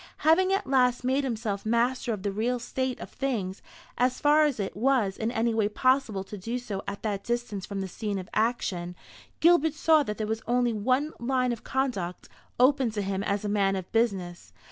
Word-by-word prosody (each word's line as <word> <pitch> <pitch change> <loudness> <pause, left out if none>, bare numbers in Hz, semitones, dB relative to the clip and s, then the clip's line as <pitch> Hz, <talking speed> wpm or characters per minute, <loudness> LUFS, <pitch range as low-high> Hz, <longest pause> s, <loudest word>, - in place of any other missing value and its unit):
Having 370 +4 +5
at 390 - +1
last 250 -2 +2
made 265 +3 +1
himself 220 -5 -2
master 235 +2 +1
of 205 -4 -4
the 200 - -1
real 230 +5 0
state 260 +1 -3
of - - -8
things, 215 -9 -3 0.4
as 255 +1 +2
far 300 +1 +5
as 280 -6 -1
it 195 - -3
was 225 -4 +2
in 220 - -2
any 235 -1 0
way 220 -2 +1
possible 255 -3 +1
to 200 +1 -9
do 230 +6 -3
so 210 -6 -5
at 200 0 -5
that 205 -3 -2
distance 235 -5 -3
from 200 -1 -4
the 190 - -3
scene 205 +2 -4
of 185 -1 -6
action, 195 -6 -1 0.5
Gilbert 320 -2 +4
saw 315 0 +4
that 210 -7 -3
there 215 - -2
was 220 +1 -2
only 245 0 +2
one 255 +8 0
line 255 0 +1
of 235 - -5
conduct 235 -10 -2 0.3
open 260 -1 +4
to 210 -2 -3
him 195 0 -2
as 200 +1 -1
a - - 0
man 200 -1 +2
of 185 -2 -6
business. 195 -7 -1
230 Hz, 205 wpm, -27 LUFS, 200-260 Hz, 0.5 s, Having